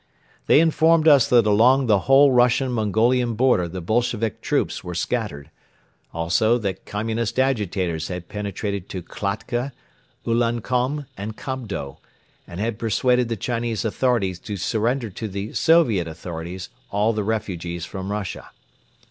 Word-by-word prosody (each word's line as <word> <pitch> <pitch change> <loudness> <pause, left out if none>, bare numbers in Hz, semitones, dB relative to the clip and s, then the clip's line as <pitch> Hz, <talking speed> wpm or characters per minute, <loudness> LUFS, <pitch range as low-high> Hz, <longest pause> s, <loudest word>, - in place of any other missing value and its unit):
They - - +6
informed 160 0 +3
us 140 -6 +6
that 120 -3 +4
along 120 +6 +4
the 105 -4 +4
whole 135 +1 +7
Russian 125 +1 +3
Mongolian 115 +2 +1
border 120 -7 +3
the 90 +2 -6
Bolshevik 115 +3 -1
troops - - -1
were 90 0 -6
scattered; 85 - -3 0.6
also 90 +8 +2
that 100 -5 -4
Communist 110 +2 -2
agitators 100 -11 0
had 90 -1 -6
penetrated 100 -1 -4
to 90 -2 -5
Kiakhta, 110 +8 -3 0.5
Ulankom 120 +4 0
and 105 +3 -6
Kobdo 110 - -5 0.5
and 85 - -8
had 110 +1 -2
persuaded 125 +2 +1
the 115 - -2
Chinese 115 0 -2
authorities 110 -6 0
to 100 +2 -6
surrender 115 +4 -1
to 110 - -5
the 100 +1 -5
Soviet 120 - +3
authorities 85 +2 -7 0.2
all 105 +3 +1
the 105 -1 -1
refugees 90 -6 -3
from 95 +3 -6
Russia. 100 -3 -5
110 Hz, 135 wpm, -23 LUFS, 95-125 Hz, 0.6 s, whole